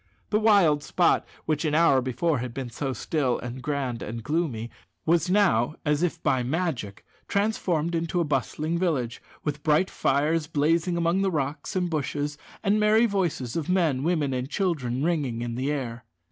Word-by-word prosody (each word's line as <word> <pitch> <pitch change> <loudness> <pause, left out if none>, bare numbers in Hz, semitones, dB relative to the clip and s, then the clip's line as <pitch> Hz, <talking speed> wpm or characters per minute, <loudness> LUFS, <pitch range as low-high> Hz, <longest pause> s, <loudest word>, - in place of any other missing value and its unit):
The 210 - +3
wild 200 -9 +4
spot - - +2 0.2
which, 155 -1 0
an 150 -2 +1
hour 155 -5 +5
before, 130 +4 0
had 120 -1 -5
been 130 -3 -4
so 135 +3 -3
still, 130 -1 0
and 125 +1 -6
grand, 135 -5 -2
and 115 +1 -5
gloomy, 140 -6 -2 0.3
was 170 +2 +2
now, 180 - +3
as 150 0 +2
if 175 -2 0
by 130 - +2
magic, 125 - -2 0.2
transformed 180 -6 0
into 165 +1 -1
a - - +3
bustling 155 +3 -1
village, 140 -10 -1 0.2
with 150 -1 -3
bright 155 +5 +2
fires 150 +3 +1
blazing 165 +3 +1
among 170 +3 +2
the 195 - +2
rocks 145 -1 -3
and 180 -1 +1
bushes, 145 -2 -2 0.2
and 210 +1 +3
merry 215 +2 +5
voices 175 - -1
of 165 -1 -2
men, 165 -8 +2
women, 155 -3 +1
and 130 +1 -3
children 140 -9 -1
ringing 140 -9 0
in 120 -1 -3
the 130 +4 -1
air. 120 -5 -4
150 Hz, 175 wpm, -26 LUFS, 130-170 Hz, 0.3 s, hour